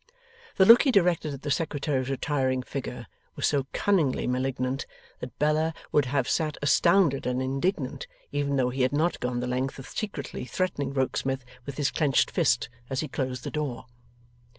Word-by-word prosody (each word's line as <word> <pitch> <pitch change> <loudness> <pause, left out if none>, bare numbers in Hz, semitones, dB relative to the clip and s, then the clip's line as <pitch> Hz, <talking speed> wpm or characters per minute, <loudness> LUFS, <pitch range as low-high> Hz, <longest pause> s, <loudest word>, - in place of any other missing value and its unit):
The 190 - +5
look 230 +4 +9
he 275 - +3
directed 175 -7 +2
at 140 -1 -8
the 145 - -2
Secretary's 140 -3 -1
retiring 130 -2 0
figure 125 -3 -5 0.3
was - - -1
so 140 -2 +1
cunningly 170 -10 +1
malignant, 130 +1 -1 0.3
that 125 - -8
Bella 155 +2 +1 0.2
would 145 -2 +3
have 130 0 0
sat 155 -2 0
astounded 165 -1 +3
and 125 0 0
indignant, 135 +1 -2 0.2
even 145 -1 0
though 125 -2 +1
he 130 +1 -2
had 130 +2 +2
not 160 +4 +1
gone 125 0 -2
the - - -2
length 130 +2 -2
of 135 - -9
secretly 200 -10 -5
threatening 145 -1 -2
Rokesmith 130 -1 -1 0.2
with 140 - -6
his 145 -2 +1
clenched 145 -5 +2
fist 135 -9 +2 0.2
as 135 -1 -1
he 155 - -3
closed 130 -2 -3
the - - -4
door. 150 -5 -3
140 Hz, 175 wpm, -27 LUFS, 130-155 Hz, 0.3 s, look